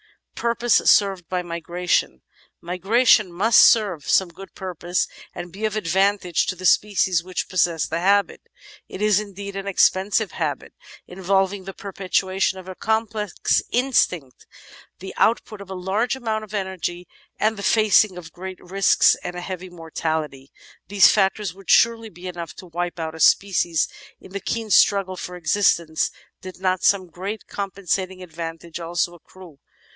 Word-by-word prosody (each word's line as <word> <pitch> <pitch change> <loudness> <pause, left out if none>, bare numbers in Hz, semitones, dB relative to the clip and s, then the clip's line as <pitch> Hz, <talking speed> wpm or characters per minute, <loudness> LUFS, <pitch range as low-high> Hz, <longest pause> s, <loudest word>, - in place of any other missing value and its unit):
The - - -9
Purpose 235 0 +2
Served 195 -4 +3
by 180 -1 -2
Migration 170 - -2 0.4
Migration 195 +3 +3
must 205 +7 +4
serve 200 -9 +3
some 190 -2 +3
good 195 +3 -13
purpose 180 -1 -2 0.3
and 175 0 -7
be 205 +5 -4
of 215 -1 -2
advan 200 +1 +2
tage 175 -3 -1
to 185 - -2
the 185 +1 -8
species 185 -3 +3
which 185 0 -4
possess 170 -3 +1
the 165 - -3
habit. 200 +3 +2 0.5
It 200 - -5
is, 210 -2 +4
indeed, 200 -1 -7
an 195 0 -5
ex 200 - +5
pensive 200 +3 -1
habit, - - -4 0.3
involving 190 +1 -1
the 195 -1 -8
perpetuation 190 -1 -1
of 185 0 -10
a 185 - -6
complex 220 -1 -1
instinct, 185 - 0 0.5
the 190 +1 -9
output 220 -2 +1
of 200 - -11
a 190 - -5
large 195 +8 -1
amount 220 -4 -3
of 215 0 -8
energy, 185 -3 -4 0.3
and 220 +1 +1
the 200 - -7
facing 215 -2 +3
of 165 -2 -10
great 185 +1 -8
risks 195 +2 +3
and 175 - -5
a 180 - -5
heavy 185 0 -6
mortality: 160 -4 -4 0.4
these 200 0 +6
factors 195 -2 +1
would 195 0 -15
surely 230 -1 +4
be 175 -1 -10
enough 170 -3 -7
to - - -11
wipe 175 0 -4
out 160 -1 -4
a 160 - -10
species 170 -3 +3 0.3
in - - -15
the 200 - -4
keen 225 +2 -4
struggle 195 0 +4
for 180 0 -7
existence 170 -2 +1 0.3
did 185 -1 -10
not 185 -1 0
some 195 -2 +3
great 195 +5 -6
compensating 190 -1 -3
advantage 165 0 -7
also 175 +1 -2
accrue. 175 -2 -15
185 Hz, 160 wpm, -22 LUFS, 175-200 Hz, 0.5 s, these